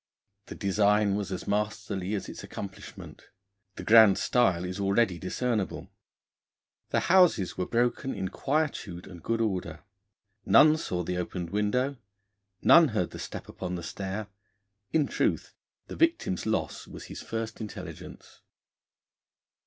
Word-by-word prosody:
The - - -8
design 100 +1 +2
was 100 -1 -3
as 95 - -5
masterly 105 -1 -2
as 100 - -4
its - - -8
accomplishment. 95 -2 -9 0.5
The - - -7
grand 110 -3 +7
style 95 -8 +2
is 90 +2 -5
already 100 -2 +2
discernible. 105 +2 -2 1.0
The - - +1
houses 175 - +4
were 90 - -2
broken 120 +2 0
in 95 -2 -3
quietude 135 - -2
and 90 -3 -11
good 115 +4 -1
order. 90 -7 -2 0.6
None 155 +9 +6
saw 90 - -3
the 90 +1 -3
opened 90 -1 -4
window; 125 +7 0 0.7
none 170 -1 +8
heard 105 -8 -1
the - - -8
step - - -7
upon 90 -1 -5
the 85 - -6
stair; 95 +5 -4 0.7
in 155 -2 +3
truth, - - -1 0.3
the - - -8
victim's 330 - +1
loss 110 - -2
was - - -10
his - - -8
first 115 0 -5
intelligence. 105 - -9
105 Hz, 135 wpm, -28 LUFS, 95-120 Hz, 1.0 s, none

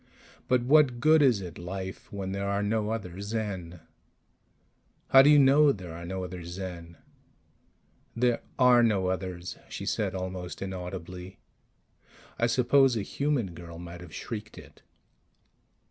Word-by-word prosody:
But 125 -1 +2
what 135 -2 +4
good 155 +4 +5
is 125 -8 +4
it 90 -3 -8
life 95 +2 -7
when 95 -2 -4
there 100 0 -2
are 100 +1 0
no 105 0 0
other 100 -4 -5
Zen?" 100 -6 -4 1.3
"How 135 - +9
do 140 - +6
you 150 - +7
know 140 +1 +6
there 90 -8 -7
are 85 +1 -8
no 95 +1 -4
other 90 -1 -7
Zen?" 85 -1 -7 1.2
"There 120 0 +1 0.2
are 125 -2 +6
no 100 -5 +2
others," 90 -1 -4
she - - -6
said - - -1
almost 90 -1 -5
inaudibly. 90 -1 -7 1.0
I 120 - +3
suppose 125 +1 +3
a 105 - -2
human 135 - -1
girl 85 0 -10
might 85 0 -9
have 90 -3 -11
shrieked 110 +5 -7
it. - - -14
95 Hz, 145 wpm, -28 LUFS, 90-120 Hz, 1.3 s, How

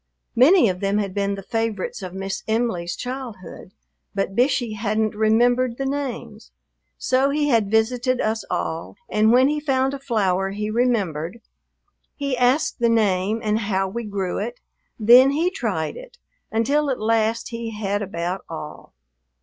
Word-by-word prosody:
Many 290 +5 +6
of 180 -2 -2
them 200 +1 0
had 200 -3 -2
been 200 0 -1
the 195 - -8
favorites 225 -3 -3
of 185 -2 -6
Miss 195 +1 -4
Em'ly's 220 -7 -1
childhood, 245 -8 -7 0.4
but 195 -1 -2
Bishey 245 -2 +1
hadn't 215 0 -1
remembered 235 +3 +2
the 270 - -2
names; 250 -6 -4 0.5
so 260 +2 +2
he 295 +1 +1
had 225 -6 +2
visited 245 +3 +1
us 220 0 -1
all, 165 -2 -3
and 215 +1 +3
when 255 +2 +5
he 300 +1 0
found 270 -2 0
a 280 - -5
flower 195 -8 0
he 210 +2 -3
remembered, 210 -7 0 0.8
he 280 -2 -2
asked 250 +5 +2
the 235 -1 +3
name 210 -1 +1
and 215 0 +1
how 195 -1 +1
we 235 +5 -5
grew 200 -4 -3
it, 235 +4 -5 0.4
then 245 +5 +7
he 325 +6 +1
tried - - -2
it, - - -12 0.3
until 280 +7 +1
at 260 - -1
last 225 +1 +1
he 230 -1 -5
had 205 -1 -1
about 180 -1 -3
all. 150 -2 -9
225 Hz, 155 wpm, -22 LUFS, 200-255 Hz, 0.8 s, then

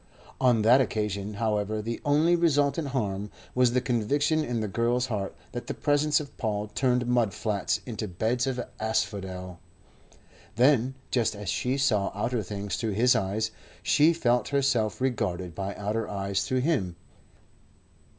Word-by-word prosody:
On 125 -4 +3
that 125 +5 +6
occasion, 105 -3 -2
however, 105 -1 -1
the 115 +2 -4
only 155 +4 +3
resultant 145 -3 +2
harm 105 -6 -2 0.2
was 125 -1 +3
the 125 - +2
conviction 140 +6 +1
in 120 -4 -2
the 110 - -2
girl's 120 +4 +1
heart 105 -6 -3 0.2
that 120 - -6
the - - -3
presence 145 +1 +2
of 145 -2 -9
Paul 105 -1 -2
turned 125 +1 +1
mud 120 -4 +1
flats 105 -4 -1
into 110 -3 -4
beds 115 +8 -1
of 130 -2 -1 0.2
asphodel. 95 -4 -2 1.0
Then, 130 +1 +3 0.2
just 115 -4 +1
as 100 -2 -5
she 125 +8 0
saw 110 -8 +2
outer 115 +3 -1
things 100 +1 -4
through 110 -3 -2
his 125 +5 +4
eyes, 110 +1 -1 0.3
she 155 +2 +5
felt 125 -8 +1
herself 130 -6 +1
regarded 95 -9 -1
by 100 +2 -4
outer 105 +2 -2
eyes 100 -1 -1
through 130 +2 +1
him. 125 - 0
115 Hz, 150 wpm, -27 LUFS, 105-130 Hz, 1.0 s, that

